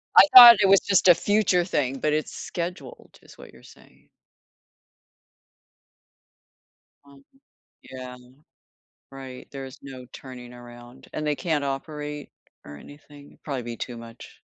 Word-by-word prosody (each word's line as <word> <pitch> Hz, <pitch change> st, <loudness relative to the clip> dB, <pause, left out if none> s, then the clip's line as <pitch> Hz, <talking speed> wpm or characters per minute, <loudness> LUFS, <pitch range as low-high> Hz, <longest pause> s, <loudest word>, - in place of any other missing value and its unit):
I -, -, +9 dB
thought 240 Hz, -2 st, +11 dB
it 195 Hz, -, +3 dB
was 195 Hz, 0 st, +5 dB
just 195 Hz, -2 st, 0 dB
a 175 Hz, -, +7 dB
future 185 Hz, -3 st, 0 dB
thing, 135 Hz, -7 st, -3 dB
but 150 Hz, +2 st, -1 dB
it's 155 Hz, 0 st, -3 dB
scheduled, 170 Hz, -6 st, -9 dB
is -, -, -18 dB
what -, -, -15 dB
you're -, -, -20 dB
saying. -, -, -21 dB, 3.0 s
Uh-huh. 140 Hz, -1 st, -19 dB, 0.6 s
Yeah. 125 Hz, -1 st, -11 dB, 0.9 s
Right, 135 Hz, -2 st, -12 dB
there's 135 Hz, 0 st, -10 dB
no 130 Hz, -2 st, -12 dB
turning 125 Hz, -2 st, -12 dB
around, 120 Hz, +1 st, -15 dB
and 155 Hz, -, -5 dB
they 150 Hz, -1 st, -1 dB
can't 155 Hz, -2 st, -3 dB
operate, 150 Hz, +1 st, -7 dB, 0.4 s
or 75 Hz, -, -11 dB
anything? 145 Hz, -, -16 dB
It'd -, -, -25 dB
probably 135 Hz, -4 st, -5 dB
be 120 Hz, 0 st, -8 dB
too 120 Hz, +1 st, -7 dB
much. 115 Hz, 0 st, -14 dB
140 Hz, 135 wpm, -23 LUFS, 125-155 Hz, 3.0 s, thought